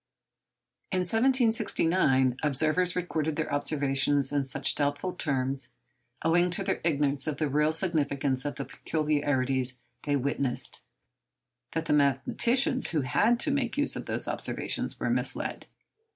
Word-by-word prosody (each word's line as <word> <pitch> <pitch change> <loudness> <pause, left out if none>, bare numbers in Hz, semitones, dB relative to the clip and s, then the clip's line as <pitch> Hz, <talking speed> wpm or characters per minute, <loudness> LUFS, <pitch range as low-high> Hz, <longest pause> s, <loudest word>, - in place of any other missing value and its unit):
In 185 -1 +1
1769, 185 - +2
observers 155 +5 +1
recorded 160 -4 -2
their 160 -2 -3
observations 140 -1 +2
in 145 -1 +1
such 135 0 +2
doubtful 145 +5 -1
terms, 135 -5 -2 0.5
owing 175 +2 +3
to 175 +3 +1
their 190 - -1
ignorance 145 -3 +1
of 150 - -2
the 155 - 0
real 150 +2 +2
significance 145 -6 0
of 145 - -4
the - - -5
peculiarities 135 -4 0 0.2
they 145 -1 0
witnessed, 140 -1 -2 0.9
that 160 0 -2
the 165 - +1
mathematicians 190 - +2
who 155 - 0
had 210 - +2
to 310 - 0
make 275 -2 -1
use 290 - +1
of - - -6
those - - -1
observations - - -2
were - - -1
misled. - - -2
150 Hz, 135 wpm, -28 LUFS, 140-180 Hz, 0.9 s, owing